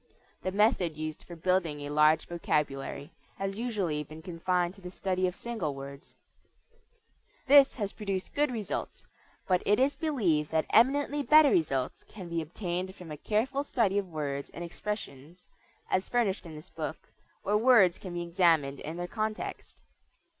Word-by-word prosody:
The 185 - -2
method 190 -6 +2
used 155 0 -5
for 175 - -8
building 170 -3 0
a 145 0 -5
large 155 +1 +4
vocabulary 150 -4 -2 0.3
has 195 0 -3
usually 200 -10 -1
been 155 +2 -12
confined 180 0 -1
to 195 - -17
the 180 - -7
study 185 0 -1
of 180 - -4
single 195 -13 -3
words. 140 0 -10 1.3
This 275 0 +7
has 205 -5 -3
produced 195 -3 -4
good 295 +1 +2
results, 225 -5 -4 0.4
but 180 -1 +3
it 205 +3 +3
is 270 +2 +3
believed 190 - +1
that 160 -1 +1
eminently 285 +5 +4
better 300 0 +6
results 135 -6 0
can 185 -5 -10
be 170 -1 -1
obtained 180 +3 -4
from 175 -5 -10
a - - -4
careful 235 - 0
study 215 -8 +1
of 195 -2 -5
words 145 -3 -4
and 175 - -5
expressions, 175 -3 -7 0.4
as 185 0 +1
furnished 210 -7 0
in 160 - -9
this 155 +5 -12
book, 160 -1 -6 0.3
where 205 - +1
words 210 -6 +5
can 180 -3 -7
be 175 - -2
examined 165 -5 +2
in 160 +3 -6
their 175 - -3
context. 215 +3 -4
180 Hz, 160 wpm, -29 LUFS, 155-210 Hz, 1.3 s, This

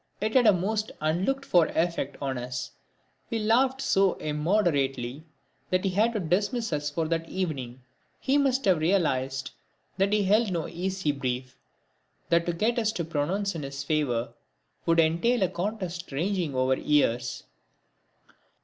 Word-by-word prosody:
It 215 +1 -1
had 250 -3 +5
a - - +9
most 210 +4 -1
unlooked 185 - 0
for 175 -9 +4
effect 165 -4 -1
on 135 -2 -2
us. 125 0 -5 0.6
We 230 - -1
laughed 255 +5 +2
so 195 -1 +3
immoderately 150 - 0 0.4
that 185 0 +1
he 195 - +1
had 220 +5 +2
to 215 - -1
dismiss 205 +5 0
us 145 0 -1
for 160 +2 -2
that 165 0 -1
evening. 130 -9 -4 0.4
He 280 +2 +2
must 270 -1 +1
have 185 -5 +4
realised 135 -7 0 0.5
that 195 +1 +2
he 210 -1 +3
held 210 +2 +3
no 170 -3 -2
easy 185 -2 -2
brief 130 -2 -4 0.7
that 170 0 +3
to 175 - +1
get 225 +7 +1
us 220 -2 +1
to 170 - -3
pronounce 175 +6 -1
in 165 - -5
his 140 0 -5
favour 140 -6 0 0.5
would 165 0 +4
entail 170 +9 +3
a - - +3
contest 180 -2 -4
ranging 170 0 -1
over 130 +1 +2
years. 125 -5 +1
170 Hz, 155 wpm, -27 LUFS, 145-205 Hz, 0.7 s, a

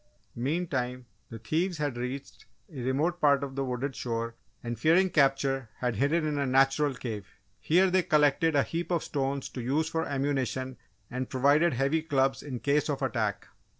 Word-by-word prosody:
Meantime, 130 -2 -2 0.2
the 115 - -7
thieves 165 - -1
had 145 -4 -2
reached 125 +3 -6 0.3
a 135 - -6
remote 150 +8 0
part 140 -1 +4
of 135 -1 -5
the 135 - -1
wooded 130 +1 -3
shore 115 0 -3 0.3
and 120 -2 -4
fearing 175 +7 +4
capture 135 -4 +2
had 120 -4 -2
hidden 155 +6 +2
in 150 -1 -1
a 140 - +1
natural 135 +2 +3
cave. 110 -6 -5 0.3
Here, 180 +4 +4
they 185 0 +4
collected 150 0 +3
a 140 - +4
heap 170 +1 -4
of 170 -3 0
stones 140 -1 -2
to 125 - -6
use 145 +6 0
for 160 0 -1
ammunition 135 -2 -2 0.3
and 130 +1 -3
provided 145 +5 +3
heavy 135 +6 +1
clubs 135 -4 +1
in 130 -5 -6
case 145 +2 +1
of 140 -1 -2
attack. 110 -6 -1
140 Hz, 175 wpm, -29 LUFS, 125-155 Hz, 0.3 s, part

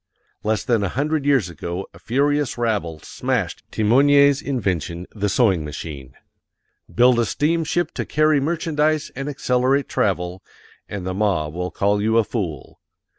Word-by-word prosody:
Less 110 -1 0
than 115 -5 +1
a 100 - 0
hundred 145 - -1
years 135 -10 +3
ago 85 +3 -5
a - - -15
furious 145 +3 0
rabble 105 -9 -1
smashed - - -2
Thimonier's 140 +5 +4
invention, 90 - -2
the 105 -1 -1
sewing 95 - +2
machine. 75 -3 -8 0.7
BUILD 125 0 +4
A 120 - +2
STEAMSHIP 165 +5 0
TO - - -2
CARRY 155 -1 +3
MERCHANDISE 155 0 0
AND 135 +3 -4
ACCELERATE 130 0 +1
TRAVEL 95 -6 -1 0.5
and 95 -3 -5
the 95 - -2
mob 90 -7 0
will 90 +1 -3
call 100 +4 +1
you 110 +2 +2
a 115 - +5
fool. 90 - -5
115 Hz, 145 wpm, -22 LUFS, 90-140 Hz, 0.7 s, a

